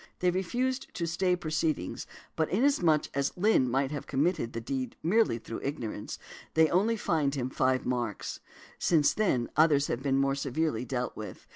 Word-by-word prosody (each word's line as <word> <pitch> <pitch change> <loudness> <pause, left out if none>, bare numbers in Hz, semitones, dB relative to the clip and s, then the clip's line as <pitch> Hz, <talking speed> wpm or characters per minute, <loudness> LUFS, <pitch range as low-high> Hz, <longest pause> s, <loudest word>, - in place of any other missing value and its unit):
They 180 0 +2
refused 250 +9 -1
to 170 - -1
stay 180 +2 +1
proceedings, 155 - -2 0.3
but 160 - 0
inasmuch 185 - +3
as 140 +4 -1
Lynn 180 - +3
might 135 +2 0
have 145 -2 -5
committed 145 -3 0
the 115 - -3
deed 130 +1 -4
merely 185 - +3
through 115 0 -7
ignorance, 120 -7 -4 0.4
they 160 -1 +5
only 215 +6 +2
fined 150 -8 0
him 130 -1 -2
five 130 0 +1
marks. 120 -4 -2 0.4
Since 155 -4 +3
then 135 - +1
others 150 -2 +4
have 120 - -2
been 135 -1 +1
more 135 0 +2
severely 140 -2 -1
dealt 125 0 -3
with. 110 - -8
145 Hz, 165 wpm, -29 LUFS, 130-175 Hz, 0.4 s, they